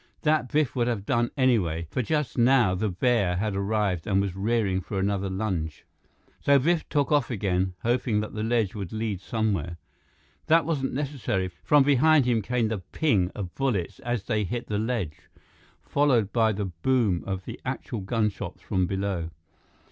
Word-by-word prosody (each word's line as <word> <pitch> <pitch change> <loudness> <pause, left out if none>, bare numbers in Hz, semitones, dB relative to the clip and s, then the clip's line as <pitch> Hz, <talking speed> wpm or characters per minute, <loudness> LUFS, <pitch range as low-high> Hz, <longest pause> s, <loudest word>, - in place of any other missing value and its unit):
That 155 -5 +2
Biff 150 -3 +1
would 120 -2 +1
have 110 -5 -2
done 120 -1 +1
anyway, 95 - +2
for 130 - 0
just 150 0 -1
now, 120 -5 +4
the 105 +3 -1
bear 100 -1 +1
had 105 +1 -1
arrived 100 -3 0
and 95 -2 +2
was 100 -2 -1
rearing 100 -2 0
for 100 +2 -5
another 100 0 0
lunge. 95 -5 -3 0.5
So 140 0 +4
Biff 160 +4 +1
took 145 -2 +1
off 145 -1 +3
again, 95 -5 -1
hoping 120 -2 +1
that 105 - -6
the 105 - -4
ledge 110 -3 +1
would 100 -5 -6
lead 110 -4 -3
somewhere. 100 -8 -1 0.7
That 165 -1 +4
wasn't 145 -5 -1
necessary. 130 -10 -2
From 145 -2 +5
behind 145 +1 +4
him 120 -3 +2
came 120 +1 0
the 110 -3 -2
ping 95 - +1
of 95 -4 -5
bullets 110 - -1
as 120 -4 -2
they 110 0 0
hit 120 +5 -3
the 105 -1 -2
ledge, 110 -9 -3 0.5
followed 125 -8 +2
by 115 -2 +3
the 100 0 -2
boom 95 +1 0
of 95 -1 -3
the - - -8
actual 115 - -4
gunshots 105 +1 -2
from 95 -1 0
below. 95 -3 -2
110 Hz, 170 wpm, -26 LUFS, 95-125 Hz, 0.7 s, From